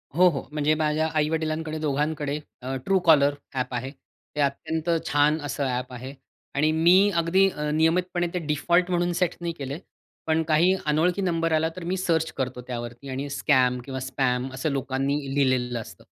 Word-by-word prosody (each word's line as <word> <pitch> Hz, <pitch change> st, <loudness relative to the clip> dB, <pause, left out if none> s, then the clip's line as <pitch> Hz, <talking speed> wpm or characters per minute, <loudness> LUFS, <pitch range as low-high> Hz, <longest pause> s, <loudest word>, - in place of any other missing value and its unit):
हो, 180 Hz, +2 st, +6 dB
हो. 140 Hz, -5 st, -5 dB
म्हणजे 150 Hz, 0 st, +2 dB
माझ्या 155 Hz, 0 st, +1 dB
आई-वडिलांकडे 155 Hz, +1 st, -1 dB
दोघांकडे 150 Hz, 0 st, -1 dB, 0.2 s
अ, 130 Hz, +1 st, -4 dB
True 195 Hz, -1 st, +4 dB
caller 145 Hz, -3 st, +6 dB, 0.2 s
ॲप 125 Hz, -1 st, -2 dB
आहे. 130 Hz, +2 st, -3 dB
ते 150 Hz, +1 st, -9 dB
अत्यंत 155 Hz, +4 st, -1 dB, 0.2 s
छान 145 Hz, +2 st, +3 dB
असं 145 Hz, -1 st, -2 dB
ॲप 125 Hz, 0 st, -3 dB
आहे. 130 Hz, +2 st, -7 dB, 0.4 s
आणि 155 Hz, +2 st, +3 dB
मी 175 Hz, +5 st, +5 dB
अगदी 185 Hz, +4 st, +3 dB, 0.2 s
नियमितपणे 175 Hz, +2 st, +1 dB
ते 180 Hz, -, -1 dB
डिफॉल्ट 175 Hz, +4 st, +2 dB
म्हणून 175 Hz, 0 st, +1 dB
सेट 180 Hz, 0 st, 0 dB
नाही 170 Hz, -1 st, -2 dB
केले. 140 Hz, -2 st, -5 dB, 0.5 s
पण 160 Hz, 0 st, +2 dB
काही 165 Hz, +4 st, +3 dB
अनोळखी 170 Hz, +6 st, +2 dB
नंबर 165 Hz, -3 st, 0 dB
आला, 160 Hz, +1 st, +2 dB
तर 180 Hz, -, -7 dB
मी 185 Hz, +2 st, -2 dB
सर्च 165 Hz, -3 st, 0 dB
करतो 130 Hz, -2 st, -3 dB
त्यावरती 120 Hz, +2 st, -6 dB
आणि 135 Hz, +2 st, -4 dB
स्कॅम 130 Hz, -3 st, +2 dB
किंवा 130 Hz, -1 st, -5 dB
स्पॅम 130 Hz, -1 st, -1 dB
असं 135 Hz, +4 st, -2 dB
लोकांनी 135 Hz, +1 st, -1 dB, 0.2 s
लिहिलेलं 125 Hz, -3 st, +1 dB
असतं. -, -, -12 dB
150 Hz, 165 wpm, -25 LUFS, 135-165 Hz, 0.5 s, हो